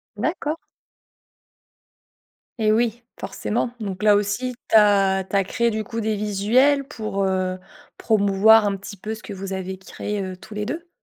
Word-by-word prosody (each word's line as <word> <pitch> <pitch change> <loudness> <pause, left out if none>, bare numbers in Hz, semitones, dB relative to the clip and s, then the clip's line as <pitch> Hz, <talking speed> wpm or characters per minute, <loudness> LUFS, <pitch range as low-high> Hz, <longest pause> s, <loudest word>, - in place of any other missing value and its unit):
D'accord. 310 - -2 2.0
Et 215 -1 +3
oui, 230 +1 +1 0.2
forcément. 220 +4 -2
Donc 195 -2 -5
là 210 -1 +6
aussi, 210 +5 -1 0.2
tu - - +2
as 195 -2 +5
tu - - -4
as 195 - +4
créé, 235 +4 0
du 215 0 -2
coup, 225 +2 -4
des 215 0 0
visuels 220 +8 +2
pour, 215 -7 -3
heu, 185 -1 0 0.4
promouvoir 210 0 +4
un 200 - 0
petit 200 +1 -9
peu 220 +4 -5
ce 215 - -14
que 205 - -7
vous 195 0 -6
avez 190 0 -4
créé, 205 +1 -5
heu, 185 -1 -5
tous 215 +3 -12
les 210 0 -3
2? 330 +6 -5
210 Hz, 170 wpm, -23 LUFS, 195-225 Hz, 2.0 s, là